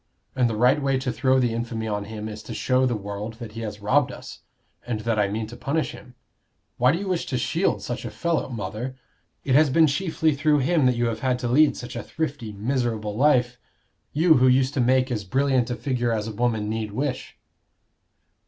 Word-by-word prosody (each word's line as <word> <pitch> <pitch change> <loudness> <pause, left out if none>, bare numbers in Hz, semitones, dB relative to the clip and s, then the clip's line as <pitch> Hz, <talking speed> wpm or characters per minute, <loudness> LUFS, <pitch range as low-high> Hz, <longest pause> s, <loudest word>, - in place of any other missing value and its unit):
And 125 -2 +2
the 110 - -2
right 125 +6 +4
way 135 -1 +1
to 130 -1 -2
throw 130 +3 +2
the 120 -3 +1
infamy 115 -1 -3
on 105 -1 -2
him 110 0 -6
is 110 0 -7
to 110 - -8
show 130 0 +2
the 120 - 0
world 105 +2 -5
that 115 -2 -8
he 115 +1 -7
has 105 -2 -6
robbed 125 +6 +2
us, - - -10 0.4
and 115 -3 -3
that 115 -1 0
I 100 - +3
mean 110 +2 -3
to 115 +3 -10
punish 150 +6 -1
him. 125 +1 -13 0.6
Why 125 +2 +4
do 165 - 0
you 195 +2 -5
wish 180 -3 -1
to 130 - -1
shield 165 +9 0
such 120 +1 -4
a - - -4
fellow, 170 -4 -1
mother? 115 +3 -5 0.5
It 135 - 0
has 150 +2 +5
been 160 +4 +5
chiefly 160 +1 +1
through 150 +1 +2
him 155 -1 +3
that 125 - +2
you 120 0 0
have 115 -1 -2
had 130 -1 0
to 125 -1 -3
lead 145 +5 +4
such 120 - -7
a 120 - -3
thrifty, 145 -8 -4
miserable 110 -1 -2
life 125 -2 +2 0.5
you 160 +1 +4
who 130 +1 +4
used 130 +1 +3
to 135 - +1
make 130 +1 +2
as 110 -4 -2
brilliant 130 +4 +1
a 120 - -1
figure 120 -3 -1
as 110 -1 -1
a - - -4
woman 110 -2 0
need 110 -1 -3
wish." 130 +1 -3
125 Hz, 220 wpm, -24 LUFS, 110-135 Hz, 0.6 s, has